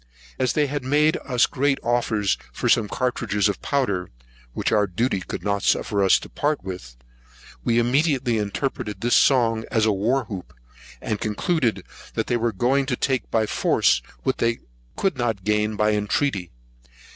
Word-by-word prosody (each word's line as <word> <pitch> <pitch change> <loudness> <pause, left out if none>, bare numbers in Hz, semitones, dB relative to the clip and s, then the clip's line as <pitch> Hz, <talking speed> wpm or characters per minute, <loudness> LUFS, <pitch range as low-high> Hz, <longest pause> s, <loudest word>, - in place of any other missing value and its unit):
As 130 - +1
they 150 - +2
had 145 -1 -3
made 150 +4 +3
us 125 -3 +3
great 135 +1 0
offers 115 -4 +1 0.2
for - - -3
some 110 - +3
cartridges 110 -4 0
of 100 - -3
powder, 100 -11 -1 0.4
which - - -1
our 105 -1 +3
duty 105 +3 0
could 95 - -6
not 100 -1 0
suffer 100 -1 +1
us 95 - +5
to - - -9
part 150 0 -1
with, 90 -11 -8 0.7
we 115 - +1
immediately 125 -1 +2
interpreted 105 -1 -3
this 120 +1 +1
song 120 -4 +4
into 115 - +2
the 110 0 +3
war 120 +6 0
hoop, 90 - -8 0.5
and 105 - -2
concluded, 110 - 0 0.3
that - - 0
they 120 - 0
were 115 0 0
going 130 +6 +1
to 125 - 0
take 130 0 -1
by 110 -1 +2
force 60 - +2 0.2
what - - -1
they 115 0 0 0.3
could 185 -9 -1
not 115 -5 -1
gain 105 +1 +1
by 105 +1 +2
entreaty. 105 -2 0
115 Hz, 170 wpm, -23 LUFS, 105-130 Hz, 0.7 s, us